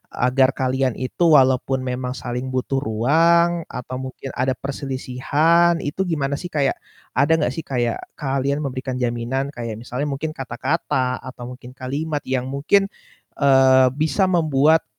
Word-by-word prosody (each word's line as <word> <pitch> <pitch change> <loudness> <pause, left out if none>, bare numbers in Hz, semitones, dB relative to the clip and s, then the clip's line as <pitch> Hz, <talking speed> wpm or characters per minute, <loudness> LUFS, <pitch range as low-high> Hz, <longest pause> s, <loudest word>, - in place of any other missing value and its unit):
agar 130 +1 +3
kalian 130 -1 0
itu 130 +7 -2
walaupun 130 0 +2
memang 125 0 -3
saling 125 +1 -4
butuh 130 +1 0
ruang 165 +8 +2
atau 125 +1 -6
mungkin 130 +1 -7
ada 130 +1 +1
perselisihan, 140 +5 +1
itu 145 +6 -3
gimana 145 -5 -1
sih 180 - -5
kayak 140 -3 +1 0.4
ada 140 +4 +3
gak 125 - +1
sih 165 - -5
kayak 120 -3 -1 0.2
kalian 140 0 -1
memberikan 130 -1 -4
jaminan? 120 +3 -1
Kayak 115 -2 -5
misalnya 125 +4 -3
mungkin 140 +3 -3
kata-kata 130 -1 -1
atau 130 -1 -10
mungkin 125 0 -11
kalimat 145 +4 -3
yang 130 -1 -1
mungkin, 150 +9 +2 0.5
eee, 130 -2 +5
bisa 160 +5 +1
membuat 160 -2 +3
135 Hz, 140 wpm, -21 LUFS, 130-150 Hz, 0.5 s, eee